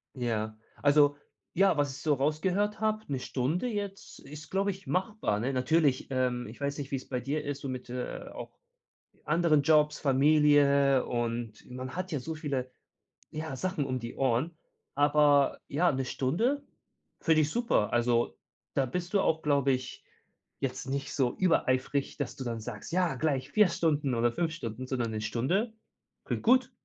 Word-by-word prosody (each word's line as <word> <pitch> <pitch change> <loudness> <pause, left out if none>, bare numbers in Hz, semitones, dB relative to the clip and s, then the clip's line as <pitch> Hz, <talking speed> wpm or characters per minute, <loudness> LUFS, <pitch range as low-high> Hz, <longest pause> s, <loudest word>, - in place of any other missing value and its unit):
Ja. 110 -3 -2 0.2
Also 145 0 +5 0.4
ja, 195 -3 +4
was 145 -2 0
ich 140 - -10
so 155 - +2
rausgehört 180 +9 0
habe, 215 0 0
1 135 - -1
Stunde 145 - -1
jetzt 200 -3 -5
ist, 150 +2 -11
glaube 195 +1 +1
ich, 195 0 -12
machbar, 185 - 0
ne? 130 +5 -1
Natürlich, 135 +1 +2
ähm, 125 -2 0
ich 110 - -11
weiß 140 0 -2
nicht, 140 -1 -6
wie - - +1
es 130 - -10
bei 125 -2 -2
dir 150 +4 -2
ist, 145 -1 -4
so 140 - -4
mit, 125 -1 -6
äh 125 0 -5
auch - - -9 0.7
anderen 155 -2 +3
Jobs, 150 0 +3
Familie. 140 -1 +4
Und 120 -2 -3
man 130 +1 -6
hat 185 0 -4
ja 150 - -1
so 160 +5 -5
viele, 135 -4 -3 0.6
ja, 155 -2 -4
Sachen 185 -2 -2
um 130 -1 -2
die 115 0 -7
Ohren. 135 +6 0 0.4
Aber 145 -1 +4
ja, 170 +4 +2
1 130 -1 -2
Stunde 225 - 0 0.6
finde 160 -1 +4
ich 150 - 0
super. 230 - +1
Also, 120 -7 +2 0.4
da 135 - +2
bist 175 +7 -4
du 200 - +4
auch, 160 -3 +1
glaube 140 -2 +3
ich 130 0 -5 0.6
jetzt 135 0 -3
nicht 135 0 -3
so 125 -3 +1
übereifrig, 140 -6 +1
dass 140 -4 -3
du 130 - -5
dann 115 -1 -3
sagst 115 - -7
ja, 180 -6 +2
gleich 135 -1 -1
4 210 +2 +5
Stunden 150 -5 0
oder 120 +1 +2
5 165 +3 -1
Stunden, 125 -5 -6
sondern 120 -4 -1
1 110 - -3
Stunde 140 - 0 0.5
klingt - - -3
gut. 255 +2 +4
140 Hz, 175 wpm, -29 LUFS, 130-165 Hz, 0.7 s, Also